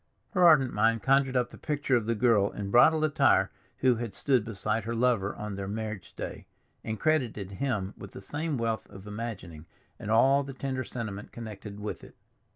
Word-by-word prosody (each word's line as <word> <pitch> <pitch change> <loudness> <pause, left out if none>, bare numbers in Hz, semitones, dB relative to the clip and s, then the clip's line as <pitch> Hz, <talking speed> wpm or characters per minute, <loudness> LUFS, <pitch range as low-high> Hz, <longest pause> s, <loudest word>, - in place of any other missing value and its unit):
Her 185 -4 +2
ardent 135 -6 +5
mind 110 +1 +2
conjured 135 -1 +3
up 125 -1 0
the - - -12
picture 145 -3 0
of 115 -3 0
the 115 - +1
girl 105 -3 +3
in 100 -1 -6
bridal 155 +7 +6
attire 135 -10 +3 0.3
who 125 -3 +4
had 115 -4 -5
stood 130 -6 +2
beside 110 0 -2
her 115 +1 -2
lover 115 -5 +1
on 105 -1 -5
their 95 0 -5
marriage 110 -1 -5
day, - - -7 0.4
and 110 -1 -4
credited 120 -11 0
him 100 -3 -2
with 100 - -11
the - - -8
same 145 +7 -3
wealth 115 -2 -2
of 95 0 -12
imagining 105 -8 -7 0.3
and - - -6
all 135 +5 +5
the 135 -1 -7
tender 130 -1 -3
sentiment 110 -5 -6
connected 105 -3 -8
with 105 0 -5
it. - - -14
115 Hz, 190 wpm, -29 LUFS, 105-130 Hz, 0.4 s, bridal